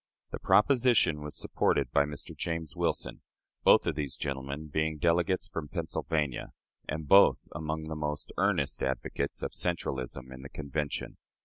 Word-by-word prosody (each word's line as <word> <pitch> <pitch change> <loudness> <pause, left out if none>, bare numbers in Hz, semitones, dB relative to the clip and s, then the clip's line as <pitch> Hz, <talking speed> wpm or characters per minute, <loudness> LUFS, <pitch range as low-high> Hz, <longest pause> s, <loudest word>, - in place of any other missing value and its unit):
The - - -4
proposition 120 - +4
was 75 0 -5
supported - - +1
by 70 - +4
Mr. 75 -1 -6
James 80 -4 -3
Wilson - - -1 0.4
both - - +6
of - - +1
these 75 -3 -2
gentlemen 70 +2 -4
being 80 +1 -1
delegates 85 +4 +2
from 80 -4 -5
Pennsylvania, 75 -4 -2 0.4
and 75 0 -3
both 100 +4 +6
among 80 0 -3
the 80 0 -5
most 75 -1 -3
earnest - - +1
advocates 65 +1 -2
of - - -2
centralism 65 -6 -2
in 65 - -10
the 70 - -9
Convention. 75 0 -4
75 Hz, 145 wpm, -30 LUFS, 70-80 Hz, 0.4 s, both